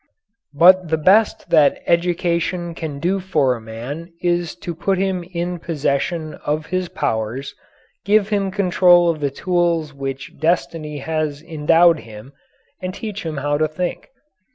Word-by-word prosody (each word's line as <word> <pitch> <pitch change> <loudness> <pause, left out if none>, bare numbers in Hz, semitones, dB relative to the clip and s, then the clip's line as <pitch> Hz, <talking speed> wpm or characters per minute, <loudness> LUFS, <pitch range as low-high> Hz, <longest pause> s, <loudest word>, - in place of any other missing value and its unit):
But 185 +3 +6
the 160 - +2
best 190 +2 +3
that 155 -4 +4
education 170 0 0
can 160 -4 -5
do 180 +6 0
for 155 -9 +1
a 120 - -7
man 125 +10 -7
is 175 -2 -1
to 175 -1 -6
put 190 +3 -1
him 190 -1 -1
in 175 0 -3
possession 155 +1 -2
of 150 +1 -1
his 185 0 -2
powers, 130 - -3 0.5
give 205 0 +3
him 200 -2 0
control 180 -2 +4
of 160 - -6
the 145 -1 0
tools 170 0 0
with 140 - -20
which 135 0 -6
destiny 160 -2 -1
has 155 0 -3
endowed 165 +1 +3
him, 110 +3 -12 0.5
and 185 0 -4
teach 215 -3 -6
him 155 -2 -4
how 145 +1 -1
to 155 - +2
think. 175 +3 -4
170 Hz, 155 wpm, -20 LUFS, 145-180 Hz, 0.5 s, But